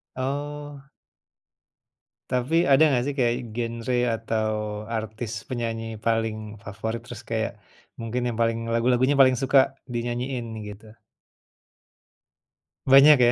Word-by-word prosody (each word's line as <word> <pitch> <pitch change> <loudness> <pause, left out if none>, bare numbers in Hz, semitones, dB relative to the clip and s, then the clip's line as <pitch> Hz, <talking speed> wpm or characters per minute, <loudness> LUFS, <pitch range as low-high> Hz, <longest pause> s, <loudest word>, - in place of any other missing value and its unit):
Oh. 145 +1 -5 1.4
Tapi 125 +6 +1
ada 140 +2 +6
nggak, 125 -1 +2
sih 145 - -4
kayak 120 -2 +2 0.2
genre 115 +1 -2 0.2
atau 110 -1 -1 0.5
artis 110 +1 -5 0.2
penyanyi 115 -2 -3
paling 110 -2 -1
favorit, 110 +3 -5
terus 120 -1 -9
kayak 110 -1 -2 0.4
mungkin 115 +2 -3
yang 115 - -4
paling 115 0 0
lagu-lagunya 125 +4 +2
paling 130 -1 +7
suka, 135 0 +4 0.2
dinyanyiin, 120 +1 -3 0.2
gitu? 105 +1 -12 1.9
Banyak, 135 +2 +8
ya? 120 0 +6
120 Hz, 110 wpm, -25 LUFS, 115-130 Hz, 1.9 s, Banyak